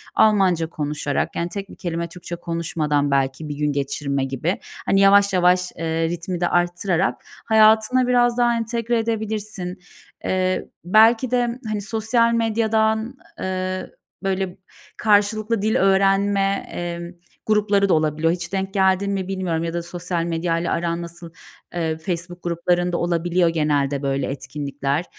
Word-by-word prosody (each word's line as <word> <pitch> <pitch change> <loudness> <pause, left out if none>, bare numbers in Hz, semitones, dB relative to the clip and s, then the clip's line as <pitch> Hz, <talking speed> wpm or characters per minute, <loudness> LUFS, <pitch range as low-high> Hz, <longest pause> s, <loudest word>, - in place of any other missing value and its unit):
Almanca 190 -6 +3
konuşarak, 150 -2 -2
yani, 170 +1 -2
tek 200 +1 -6
1 - - -11
kelime 170 -1 -3
Türkçe 175 0 -7
konuşmadan 160 -4 -1
belki 135 +2 0
bir 145 - -4
gün 150 0 0
geçirme 140 0 -2
gibi, 135 +8 -2 0.3
hani, 195 - +3
yavaş 200 0 +5
yavaş, 180 0 +3
eee, 165 0 -1
ritmi 175 +1 -4
de 175 - +3
arttırarak 175 0 +1 0.3
hayatına 220 +3 +4
biraz 245 -1 +3
daha 240 -1 +3
entegre 230 +1 -1
edebilirsin. 215 -4 -3 0.4
Eee, 185 0 0 0.2
belki 225 +6 +5
de 245 -1 0
hani, 215 -1 -2
sosyal 225 +3 +1
medyadan, 220 +1 +1 0.2
eee, 185 0 -3 0.3
böyle, 190 -1 -2 0.4
karşılıklı 215 +1 +2
dil 220 +3 +1
öğrenme, 195 -1 +2
eee, 170 0 -5 0.3
grupları 205 -2 +2
da - - +4
olabiliyor. 155 +1 +1
Hiç 175 0 -6
denk 195 0 -2
geldin 190 0 +2
mi 190 -2 -2
bilmiyorum 185 -4 -2
ya 165 0 -3
da 170 - -2
sosyal 175 0 -3
medyayla 165 0 -1
aran 170 0 -1
nasıl, 170 0 -9 0.4
eee, 160 -2 -1
Facebook 175 +2 -5
gruplarında 175 +1 0
olabiliyor 175 0 +1
genelde, 145 -3 0
böyle, 135 -1 -1
etkinlikler. 140 +2 -3
180 Hz, 140 wpm, -22 LUFS, 165-210 Hz, 0.4 s, yavaş